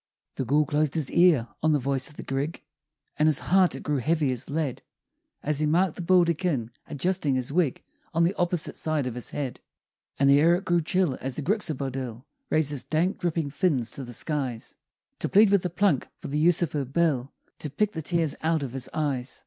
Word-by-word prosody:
The 130 - -1
Gool 150 +5 +3
closed 150 +1 0
his 155 -5 -2
ear 170 -9 +4
on 155 0 +3
the - - +4
voice 135 -1 -1
of 150 - -16
the - - -6
Grig, 140 +5 -3 0.6
And 155 - +4
his 155 -3 +4
heart 185 -1 +3
it - - -8
grew 150 -1 0
heavy 150 +1 +1
as 125 0 -4
lead 145 -3 -2 0.6
As 150 0 0
he 155 - +1
marked 175 +2 +2
the - - -6
Baldekin 170 -8 +2 0.2
adjusting 150 -1 0
his 130 +2 -2
wig 165 -6 +1 0.3
On 165 0 +2
the 175 +3 +2
opposite 175 -3 0
side 155 -4 -1
of 125 - -3
his 125 0 -5
head; 135 -4 -4 0.6
And 140 - +3
the 140 +1 +6
air 165 +3 +5
it 190 +3 -4
grew 175 0 +2
chill 175 -4 0
as 130 -1 -3
the 150 - -4
Gryxabodill 135 - -3 0.2
Raised 155 -2 +2
his 140 -4 -2
dank, 170 +5 0
dripping 165 -4 -1
fins 140 - 0
to 135 - -6
the 120 - -8
skies, 130 -3 -3 0.4
To - - -1
plead 205 0 +6
with 200 -2 +4
the 180 - -2
Plunk 175 -5 +1
for - - -8
the 150 +2 -1
use 170 +2 +4
of 160 - -2
her 145 -2 -1
bill 140 -2 0 0.3
To 150 - -3
pick 210 +8 0
the 160 - -5
tears 165 -2 0
out 160 -2 +1
of 130 -3 -5
his 130 -2 -4
eyes. 135 -5 -2
150 Hz, 215 wpm, -26 LUFS, 135-170 Hz, 0.6 s, the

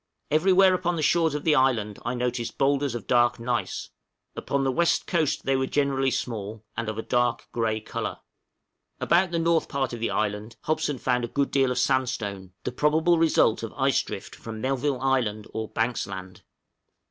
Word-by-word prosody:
Everywhere 185 +4 +5
upon 175 -1 0
the 155 - -2
shores 165 -1 +3
of 150 - -3
the 160 - +3
island 120 -7 +1
I 120 - -2
noticed 120 -1 -2
boulders 140 -2 +1
of 120 - -5
dark 120 -1 +3
gneiss; 120 0 -3 0.4
upon 140 -1 -1
the 135 - +1
west 170 +5 +2
coast 165 -5 0
they 135 - +2
were 130 0 0
generally 135 -2 +1
small, 110 -4 -4
and 115 -1 -2
of 110 - -5
a 110 - -3
dark 120 -1 0
gray 110 -2 0
color. 110 - -4 0.8
About 175 +3 +3
the 170 - -2
north 165 0 +1
part 135 -3 -1
of 120 - -5
the 115 - -1
island 105 +2 -2
Hobson 155 -2 -1
found 125 -1 0
a - - -1
good 140 +4 -1
deal 135 -2 +3
of 125 - -2
sandstone, 110 -8 -1
the - - -2
probable 160 +6 +2
result 160 -8 +3
of 115 - -6
ice 135 -1 +2
drift - - -8
from 110 -1 -8
Melville 135 +2 -1
Island 120 -6 0
or 110 0 -3
Banks 115 +2 -1
Land. 95 -2 -8
130 Hz, 185 wpm, -26 LUFS, 115-150 Hz, 0.8 s, Everywhere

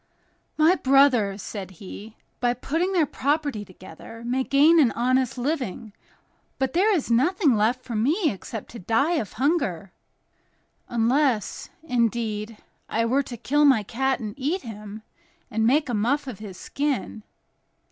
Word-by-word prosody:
"My 315 +3 +5
brothers," 260 - +3
said 195 -4 -6
he, 210 +4 -10 0.2
"by 245 -1 +1
putting 330 +9 -1
their 350 -5 +3
property 285 -5 -1
together, 190 +4 -12
may 255 +2 0
gain 300 +5 +5
an 260 -7 +5
honest 255 +1 +1
living, 245 - -3 0.6
but 265 -1 -1
there 395 +5 +3
is 285 -8 -2
nothing 295 - +3
left 230 +4 +1
for 235 - -6
me 300 - +2
except 205 +2 -8
to 235 - -9
die 275 - +1
of 215 -9 -4
hunger, 240 - -1 1.0
unless, 240 0 0
indeed, 230 -5 -1 0.3
I 230 +1 0
were 260 +4 +2
to 250 -3 -8
kill 290 +6 +1
my 265 -7 +5
cat 265 +5 -1
and 215 -3 -5
eat 315 +8 -1
him, 215 -2 -9 0.5
and 220 +1 +1
make 285 +4 +3
a 245 - -3
muff 245 +8 0
of 250 -7 -7
his 200 -4 -9
skin." 280 -6 -3
245 Hz, 145 wpm, -24 LUFS, 220-285 Hz, 1.0 s, My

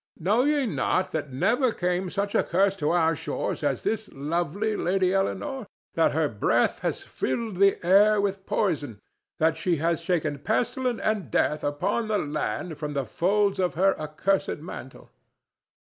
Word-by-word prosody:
Know 210 - +2
ye 290 -2 +2
not 185 -4 0
that 145 -4 -3
never 235 - +2
came 180 -1 -1
such 200 +2 -2
a - - +4
curse 195 +2 +2
to 150 -3 0
our 165 -1 +3
shores 155 0 -3
as 140 -4 0
this 220 -1 -2
lovely 175 +9 -1
Lady 185 0 +1
Eleanore, 240 +5 -2 0.3
that 165 - +2
her 155 0 +2
breath 105 -6 +1
has - - -3
filled 210 - -3
the 195 +1 +4
air 205 +3 +5
with 195 -1 -2
poison, 145 - -1 0.4
that 160 0 +2
she 175 +1 +1
has 165 +2 0
shaken 155 -6 -1
pestilence 245 - -1
and 210 - 0
death 150 +7 +1
upon 145 +10 -1
the 215 -1 +1
land 150 - -3
from 150 -1 -4
the 140 -2 -1
folds 200 - +1
of 180 -2 0
her 195 +3 +4
accursed 155 +6 -1
mantle?" 145 - -10
180 Hz, 160 wpm, -26 LUFS, 155-205 Hz, 0.4 s, air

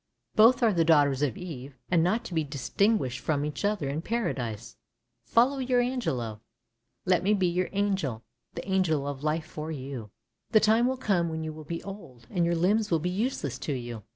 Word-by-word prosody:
Both 235 +3 +6
are 220 -3 +4
the 170 -2 +3
daughters 145 -4 +4
of 140 -6 0
Eve, 140 -6 -8
and 170 -3 +4
not 215 +7 +1
to - - -7
be 160 -1 +1
distinguished 145 - 0
from 145 -1 0
each 150 -2 -4
other 205 -8 0
in 145 +3 -2
Paradise. 120 - -3 0.5
Follow 260 +4 +3
your 255 -1 +2
Angelo! 130 - -2 0.6
Let 180 -2 +3
me 205 +3 +3
be 190 -2 +1
your 180 +1 0
angel, 190 - -1 0.3
the - - -6
angel 170 -7 +1
of 140 -1 -4
life 155 +1 0
for 160 0 -6
you! 130 -6 -6 0.4
The 215 - +8
time 220 +3 +4
will 260 0 -1
come 185 -8 +1
when 160 0 -4
you 155 0 -4
will 155 0 -10
be 165 +2 -5
old, 165 - -10
and 175 - +1
your 170 0 +2
limbs 205 +6 +2
will 165 - +3
be 175 +3 -2
useless 185 - -2
to 150 - -2
you. 120 -3 -5
165 Hz, 200 wpm, -28 LUFS, 140-205 Hz, 0.6 s, The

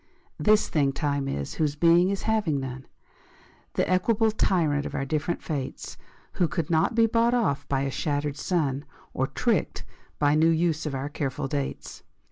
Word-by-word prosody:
This 215 0 +4
thing 140 -3 +1
Time 140 -1 -1
is, 70 - -3
whose 150 -2 0
being 170 +3 +4
is 200 0 -2
having 210 -10 +1
none, 130 0 -6 0.9
The - - +1
equable 215 +5 +2
tyrant 160 -9 +1
of - - -6
our 135 - -1
different 155 +4 -2
fates, 140 -5 -5 0.4
Who 175 - +1
could 165 0 -3
not 165 +8 +2
be 230 -1 +5
bought 230 +2 +2
off 145 - 0
by 135 -1 +1
a 135 0 -1
shattered 145 0 -2
sun 145 -4 -1 0.3
Or - - 0
tricked - - -1 0.3
by 145 -1 +3
new 160 +2 +4
use 165 -1 +1
of 140 - -3
our 135 +2 -3
careful 140 -2 -3
dates. 140 0 -4
150 Hz, 170 wpm, -26 LUFS, 140-180 Hz, 0.9 s, be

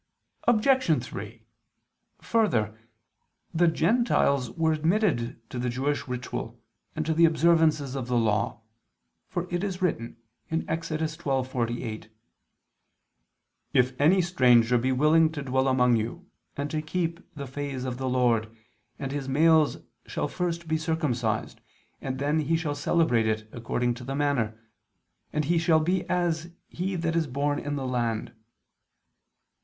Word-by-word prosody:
Obj. 240 - +3
3: 110 +2 -8 0.8
Further, 120 - +1 0.8
the 175 +1 +3
Gentiles 165 - +2
were 160 +4 +1
admitted 155 - 0
to 125 - -4
the 125 0 -1
Jewish 135 +4 -1
ritual 125 -1 -5 0.4
and 155 - -2
to 160 - +1
the 165 +1 +5
observances 160 -4 +3
of 130 -3 -4
the 125 -1 +1
Law: 110 -1 0 0.7
for 175 - -3
it 175 +2 0
is 190 -3 -3
written 120 - -2 0.3
(Ex. 160 0 -2
12:48): 130 -8 -2 1.6
"If 130 +1 +2
any 180 +6 +5
stranger 125 -8 +4
be 130 +3 0
willing 155 +4 +4
to 145 -3 -4
dwell 130 0 +1
among 125 -2 +4
you, 120 +12 -4 0.3
and 145 +1 -3
to 155 - -1
keep 170 +1 -2 0.2
the 140 -1 -5
Phase 135 -1 -5
of 125 -1 -4
the 130 -1 -1
Lord, 120 -3 +2 0.5
all 135 - -3
his 140 -1 -4
males 155 +2 +4 0.3
shall - - -2
first 170 -2 -3
be 160 0 0
circumcised, 150 -9 -1 0.4
and 130 -1 -3
then 145 +3 +1 0.2
shall 160 -3 -2
he 145 - -8
celebrate 135 -10 +2
it 110 0 -1
according 120 +1 -1
to 125 +1 -9
the 135 +2 -4
manner; 130 -7 0 0.7
and 150 -1 -1
he 170 +3 +2
shall 160 -1 +4
be 180 +4 0
as 170 -2 0 0.2
he 185 +2 -3
that 165 -1 -1
is 165 -2 +1
born 145 +2 -1
in 145 0 -3
the 135 -2 -3
land." 120 -3 -2
145 Hz, 140 wpm, -27 LUFS, 125-165 Hz, 1.6 s, the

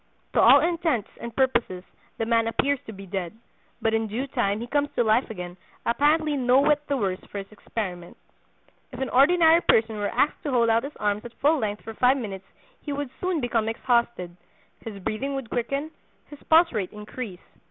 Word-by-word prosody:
To - - +4
all - - +8
intents 325 - -1
and 235 -1 -7
purposes 235 -9 +1 0.3
the 225 - -1
man 230 0 +2
appears 275 +4 +1
to - - -6
be 195 -1 -10
dead; 180 -2 -4 0.5
but 225 - +2
in 225 0 +1
due 230 +6 -3
time 225 -7 -1
he 235 - -4
comes 290 +3 0
to 240 - +3
life 220 +3 +2
again, 180 -4 -7 0.3
apparently 300 +4 +2
no 255 -1 +4
whit 290 +1 +3
the 280 - 0
worse 195 -5 -1
for - - -6
his 195 +1 -7
experiment. 185 -5 -6 0.7
If 250 - -9
an 265 - -2
ordinary 325 +5 +5
person 220 -6 +2
were 205 0 -1
asked 300 - 0
to 295 - -4
hold 235 -3 +3
out 230 +3 +2
his 290 - -8
arms 210 0 -1
at 240 -1 -10
full 300 +2 +3
length 210 -3 -3
for 225 - -7
five 250 +4 +3
minutes 195 -6 -6 0.4
he 295 - -6
would 285 -2 -4
soon 365 -4 -1
become 230 -3 0
exhausted, 235 -6 0 0.5
his 220 -3 -7
breathing 270 +8 -2
would 270 -4 -6
quicken, 275 +6 -2 0.4
his 290 - -11
pulse 330 +2 +6
rate 200 -5 -2
increase. 210 -2 -7
235 Hz, 195 wpm, -25 LUFS, 210-280 Hz, 0.7 s, all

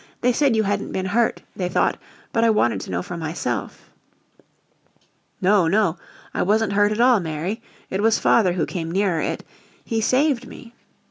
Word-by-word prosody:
They 250 0 +3
said 275 -2 +2
you 220 - +2
hadn't 200 0 -2
been 190 - -2
hurt, 225 +4 0
they 180 -2 -2
thought, - - +1 0.3
but 225 - +2
I 230 - +5
wanted 120 - +2
to - - -8
know 90 -1 -2
for 175 - -6
myself." 160 0 -4 1.5
"No, 190 -2 +3
no, 195 -2 +2 0.4
I - - -1
wasn't 215 +1 +2
hurt 205 +1 +3
at 215 - -2
all 245 -2 +5
Mary. 170 +6 -4 0.3
It 190 - -1
was 225 +1 +3
father 190 -6 +3
who 175 - 0
came 165 -3 -4
nearer 185 -2 +1
it. - - -3 0.4
He 225 -2 -1
saved 255 +1 +1
me." 235 -2 -12
205 Hz, 180 wpm, -22 LUFS, 175-225 Hz, 1.5 s, I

